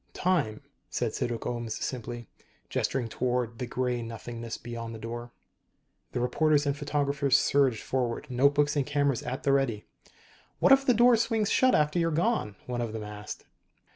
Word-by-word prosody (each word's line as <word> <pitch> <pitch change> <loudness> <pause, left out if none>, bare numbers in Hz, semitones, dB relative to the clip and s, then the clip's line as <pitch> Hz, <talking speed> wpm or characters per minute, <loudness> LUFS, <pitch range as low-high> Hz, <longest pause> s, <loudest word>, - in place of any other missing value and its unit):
"Time," 150 -13 0 0.3
said - - -1
Cydwick 120 -1 -2
Ohms 120 -2 -3
simply, 120 -2 -5 0.4
gesturing 125 -3 -1
toward 120 -1 -1
the 125 - -3
gray 125 0 -1
nothingness 115 0 -6
beyond 115 -1 -6
the - - -8
door. 120 +2 -6 0.8
The - - -1
reporters 145 +4 +2
and 140 -1 +1
photographers 140 -2 +1
surged 135 -5 +2
forward, 125 -3 -1
notebooks 140 +3 +3
and 145 - +2
cameras 140 -2 +1
at 130 +2 -5
the 140 - +3
ready. 125 -7 0 0.7
"What - - +4
if 270 0 +6
the 250 - +5
door 240 +1 +6
swings 220 -2 +1
shut 260 0 +4
after 150 +3 +2
you're 165 -1 +2
gone?" 165 - 0
one 120 -1 -3
of 115 -2 -3
them 110 -1 -4
asked. 105 0 -8
125 Hz, 165 wpm, -28 LUFS, 115-145 Hz, 0.8 s, if